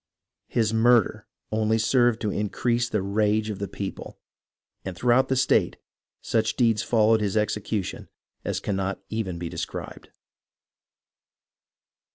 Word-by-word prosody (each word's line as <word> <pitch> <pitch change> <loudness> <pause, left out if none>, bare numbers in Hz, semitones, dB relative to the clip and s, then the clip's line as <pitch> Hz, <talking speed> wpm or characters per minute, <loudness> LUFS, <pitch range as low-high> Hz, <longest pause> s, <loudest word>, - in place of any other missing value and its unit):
His 110 -2 0
murder 115 0 +3 0.2
only 110 0 +1
served 120 0 +2
to 105 - -1
increase 120 +4 0
the 105 -3 -1
rage 105 +2 +1
of 100 - -6
the 100 - -3
people, 100 +1 -7 0.7
and 95 -3 -6
throughout 125 +4 +3
the 130 - +1
state 130 - +2 0.5
such 110 -1 0
deeds 115 -4 +2
followed 110 -1 +3
his 105 0 0
execution 105 -2 -2 0.3
as - - -2
cannot 95 -1 -2
even 105 -6 -3
be 85 0 -4
described. - - -6
110 Hz, 125 wpm, -25 LUFS, 100-115 Hz, 0.7 s, murder